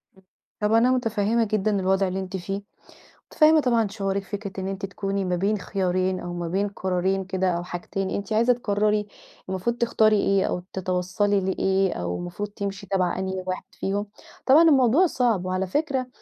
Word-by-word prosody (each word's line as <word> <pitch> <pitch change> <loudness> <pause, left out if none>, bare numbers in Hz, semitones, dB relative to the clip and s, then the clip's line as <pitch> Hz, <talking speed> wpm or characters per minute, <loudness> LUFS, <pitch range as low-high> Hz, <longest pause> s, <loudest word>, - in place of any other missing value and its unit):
امم. 190 - -22 0.4
طب، 210 +1 +2
أنا 240 +3 +5
متفهِّمة 225 -2 +1
جدًا 210 -1 0
الوضع 190 +1 +2
اللي 190 +1 -3
أنتِ 190 0 -4
فيه، 195 +3 -4 0.7
متفهِّمة 310 0 +5
طبعًا 235 -5 +2
شعورِك. 195 -1 -2
فكرة 200 0 -6
إن 190 - -3
أنتِ 195 +1 -4
تكوني 195 0 -3
ما 180 0 0
بين 200 +4 +1
خيارين 185 -1 -1
أو 175 0 -6
ما 175 -1 -4
بين 195 +4 0
قرارين 190 0 -1
كده، 190 -1 0
أو 170 0 -2
حاجتين، 185 +2 -4
أنتِ 200 +2 -3
عايزة 235 +3 +4
تقرِّري، 210 -2 0 0.4
المفروض 190 +6 -1
تختاري 220 -2 +3
إيه، 195 -1 +2
أو 180 - -2
تتوصَّلي 190 +2 0
لإيه، 190 0 +1
أو 90 0 -3
المفروض 180 +4 -5
تمشي 200 -1 -5
تبع 185 -1 0
أنهي 190 0 -3
واحد 185 - -3
فيهم، 200 +2 -3 0.4
طبعًا 290 +5 +7
الموضوع 270 +5 +5
صعب. 235 - +1
وعلى 185 +1 -1
فكرة، 270 - -1
195 Hz, 175 wpm, -24 LUFS, 185-215 Hz, 0.7 s, طبعًا